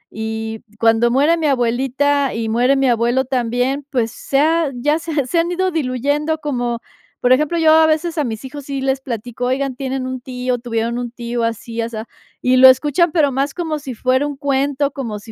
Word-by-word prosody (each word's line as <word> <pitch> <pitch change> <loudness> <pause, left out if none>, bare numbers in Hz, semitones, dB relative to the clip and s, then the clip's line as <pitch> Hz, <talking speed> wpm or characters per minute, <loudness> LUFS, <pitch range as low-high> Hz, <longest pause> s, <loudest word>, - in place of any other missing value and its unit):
y 220 0 -4 0.2
cuando 230 +1 +3
muere 295 +6 +3
mi 315 -2 0
abuelita 270 +2 +1
y 225 -1 -2
muere 245 +4 +3
mi 270 -1 +2
abuelo 240 +3 +1
también, 255 +2 -1
pues, 235 -4 0
se 270 +3 -1
ha 320 +1 +2
ya 295 +6 +1
se 330 0 -6
ha 285 -3 0
se 335 - +1
han 340 +1 0
ido 375 +1 0
diluyendo 295 +2 -1
como 245 -5 -2 0.4
Por 250 - +1
ejemplo, 300 +6 +3
yo 315 -1 +5
a 320 0 +6
veces, 320 +2 0
a 300 - +2
mis 220 -1 -5
hijos 280 +1 -8
sí 275 -1 -4
les 270 0 0
platico, 245 -1 -5
oigan, 260 +1 -1
tienen 265 -1 -3
un 260 0 -4
tío, 250 0 -3
tuvieron 235 0 -2
un 240 -1 -4
tío 235 -1 -4
así 230 0 -4
asá, 225 -1 -3 0.4
y 255 0 +3
lo 260 +1 +9
escuchan 295 +6 +3
pero 295 -5 +3
más 275 +2 -1
como 320 -3 -2
si 275 -3 -6
fuera 260 +4 +1
un 290 - -5
cuento, 280 0 0
como 230 -6 -5
si 225 +2 -12
260 Hz, 210 wpm, -18 LUFS, 240-290 Hz, 0.4 s, lo